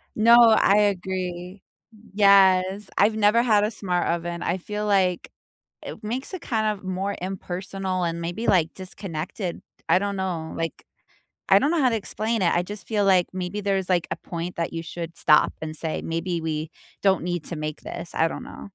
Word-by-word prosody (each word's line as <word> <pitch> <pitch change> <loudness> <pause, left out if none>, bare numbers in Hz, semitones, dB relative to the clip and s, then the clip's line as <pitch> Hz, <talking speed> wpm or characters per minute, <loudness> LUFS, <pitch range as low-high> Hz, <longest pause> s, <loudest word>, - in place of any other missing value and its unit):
No, 230 +2 +6 0.2
I 200 - +4
agree. 185 -2 -2 0.5
Yes, 195 -1 +4
I've 215 +2 +4
never 215 +2 +4
had 215 -4 +3
a 210 - 0
smart 180 -4 -1
oven. 170 0 -2
I 175 - 0
feel 210 +3 -4
like 190 -3 +1 0.5
it - - -8
makes 255 - -4
it 365 - -5
kind 220 -4 -1
of - - -19
more 190 +2 -2
impersonal 185 0 -3
and 170 0 -2
maybe, 175 +7 -4
like, 165 -4 +2
disconnected. 180 -1 -5 0.3
I - - +5
don't 200 0 -3
know, 175 -4 -3
like, 165 0 -4 0.6
I - - +7
don't 290 - +1
know 340 - +1
how 260 - +4
to 225 - 0
explain 220 +1 -2
it, 170 - +3
I 175 - +2
just 205 +3 -8
feel 210 -3 0
like 185 -3 +4
maybe 185 +2 -4
there's, 195 -2 -1
like, 180 -2 +1
a - - -2
point 170 +1 -6
that 170 - -2
you 165 0 -4
should 170 0 -7
stop 150 - +4
and 155 0 -4
say, 160 0 -3
"Maybe 165 +1 -2
we 155 0 -3 0.3
don't 190 -3 +3
need 175 -2 -2
to 170 - -5
make 155 0 -5
this." 170 - -7
I 165 - +2
don't - - -7
know. - - -10
185 Hz, 190 wpm, -24 LUFS, 170-205 Hz, 0.6 s, I